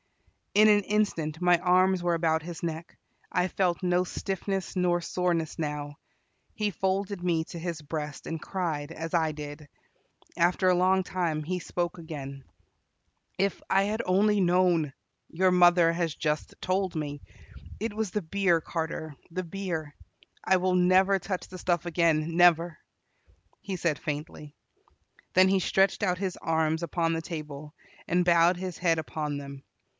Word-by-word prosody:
In 215 +1 +7
an 205 -1 +5
instant 180 -7 -1
my 175 -1 +4
arms 185 +1 +3
were 175 -1 +2
about 160 -1 +1
his 170 +1 -8
neck 165 0 -5 0.3
I 180 0 +1
felt 185 -1 0
no 180 0 +2
stiffness 195 +1 -3
nor 180 -1 +2
soreness 170 -2 -1
now. 145 -2 -3 0.6
He 210 -2 -1
folded 190 0 -2
me 165 -3 +1
to 170 - -8
his 165 -2 -4
breast, 150 -1 -5
and 165 -1 -4
cried, 165 -6 -3
as 165 0 -6
I 160 -2 +2
did. 150 0 -8 0.7
After 180 +2 +2
a 180 - +5
long 185 +1 +3
time 170 -5 -2
he 180 +4 -2
spoke 175 0 -3
again: 140 -4 -7 0.9
"If 200 0 0
I 195 - +4
had 215 +3 -1
only 205 +2 +3
known 175 -4 +3 0.4
your 185 +2 +2
mother 175 -2 +5
has 170 -2 -1
just 150 -1 -2
told 185 -1 -1
me. 145 -2 -4 0.6
It 225 0 -3
was 215 -3 -2
the 210 - -2
beer, 175 0 +2
Carter, 160 -2 -4
the 185 +2 -3
beer. 165 -4 -4 0.5
I 190 - +4
will 185 0 +1
never 185 +2 +4
touch 190 -1 -4
the 185 - -10
stuff 175 -1 0
again, 165 -1 +1
never," 170 -1 +4 0.8
he 195 -2 -4
said 165 -4 0
faintly. 150 0 -6 0.8
Then 185 +1 +6
he 190 0 +3
stretched 190 +1 +2
out 180 -2 +1
his 190 -1 -3
arms 160 0 0
upon 165 0 0
the 165 - -2
table, 150 -2 -7 0.3
and 180 0 +2
bowed 170 0 +4
his 185 -1 -5
head 165 -2 +2
upon 150 -2 -3
them. 140 -1 -9
175 Hz, 155 wpm, -28 LUFS, 160-185 Hz, 0.9 s, In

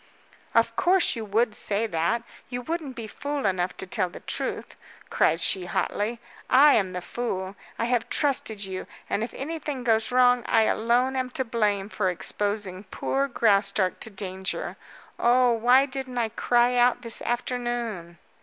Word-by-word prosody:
"Of - - +3
course 370 -3 +3
you 225 - -4
would 220 +2 +1
say 210 +1 0
that. 200 +4 0 0.3
You 245 0 -4
wouldn't 315 -3 -4
be 230 -3 -6
fool 285 +5 -4
enough 185 -2 0
to - - -4
tell 185 -2 -1
the - - -11
truth," - - -4 0.4
cried 165 - +2
she 180 +1 +2
hotly. 220 +5 -1 0.3
"I 285 +3 +7
am 190 -3 +1
the 180 -1 -4
fool! 195 -5 -4 0.2
I 230 - 0
have 240 -1 0
trusted 240 -8 0
you 190 -1 -6 0.2
and 215 - 0
if 235 - -4
anything 295 -2 -4
goes 225 -1 +2
wrong 250 -1 +5
I 225 -2 +4
alone 240 +4 +1
am 255 -1 -1
to 260 - 0
blame 210 -4 0
for 205 -3 -1
exposing 200 +1 -3
poor 275 +7 -1
Graustark 200 -5 +2
to - - -4
danger. 190 -2 -4 0.4
Oh, 245 +1 +4
why 245 +4 +4
didn't 260 -2 -6
I 230 -2 +1
cry 240 +2 +2
out 245 +1 +3
this 230 -1 0
afternoon?" 240 -7 -3
230 Hz, 165 wpm, -26 LUFS, 200-250 Hz, 0.4 s, I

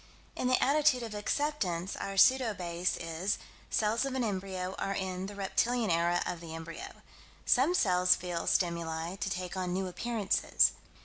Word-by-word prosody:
In - - -1
the 255 0 +3
attitude 285 -2 +3
of 225 -2 -6
Acceptance, 205 - -1
our 195 0 -5
pseudo 250 0 +5
base 175 -1 -1
is: 165 +4 -2 0.3
Cells 220 +3 +1
of 270 -1 -2
an 260 - 0
embryo 190 -3 -3
are 195 - -1
in 190 -1 -3
the 205 - -8
reptilian 220 +2 0
era 170 +1 +2
of 175 - -3
the 165 -1 -7
embryo; 165 0 -8 0.4
Some 280 +8 +4
cells 180 - +4
feel 175 -2 -4
stimuli 170 0 0
to 200 - -2
take 180 0 -4
on 180 -1 -2
new 190 +1 -1
appearances. 210 +2 +1
190 Hz, 165 wpm, -31 LUFS, 175-230 Hz, 0.4 s, pseudo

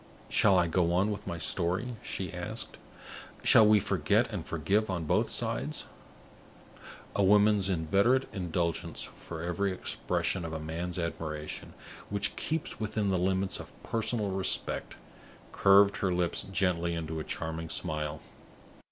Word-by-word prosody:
"Shall 100 -3 +5
I 90 - +4
go 85 0 +1
on 95 +4 +2
with 105 0 -6
my 85 - -3
story?" 90 +9 -1
she - - -4
asked. - - -4 0.6
"Shall 110 - +7
we 105 0 +6
forget - - +2
and - - -3
forgive 100 +7 0
on 90 -3 -2
both - - +2
sides?" - - -2 1.3
A - - +2
woman's 105 0 +4
inveterate 100 +10 +2
indulgence 85 -3 -2
for 80 -1 -8
every 90 +3 0
expression 95 0 -1
of 80 -1 -5
a 80 - -3
man's 80 +3 -4
admiration 80 -3 -5 0.3
which 100 0 -1
keeps 160 -1 -3
within 105 -2 -1
the 95 - +1
limits 95 +1 0
of - - -10
personal 110 -2 -1
respect 95 0 -1 0.6
curved 100 +1 +5
her 95 - 0
lips 90 -1 0
gently 85 -3 +1
into 80 -1 -4
a - - -3
charming 80 +1 -4
smile. 75 -3 -2
90 Hz, 140 wpm, -30 LUFS, 85-100 Hz, 1.3 s, Shall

